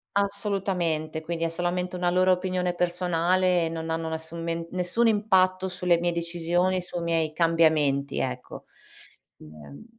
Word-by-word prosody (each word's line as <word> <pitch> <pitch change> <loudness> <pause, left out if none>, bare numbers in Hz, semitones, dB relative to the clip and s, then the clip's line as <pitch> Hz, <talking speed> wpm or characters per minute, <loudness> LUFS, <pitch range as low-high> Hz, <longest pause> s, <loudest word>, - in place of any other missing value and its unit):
Assolutamente, 190 -6 -1
quindi 165 +1 -3
è 165 - 0
solamente 175 +2 -2
una 180 0 0
loro 185 +1 +3
opinione 180 -1 -1
personale 175 0 +1
e - - -3
non 165 0 -5
hanno 160 0 -2
nessun 160 +1 -5
men 165 0 -3
nessun 185 +6 +1
impatto 190 -3 +2
sulle 180 -2 +1
mie 175 0 0
decisioni, 175 +2 0
sui 175 -1 -5
miei 165 -2 0
cambiamenti, 155 -4 +2
ecco. 125 -1 -5 0.7
Ehm 75 - -13
175 Hz, 140 wpm, -26 LUFS, 165-185 Hz, 0.7 s, loro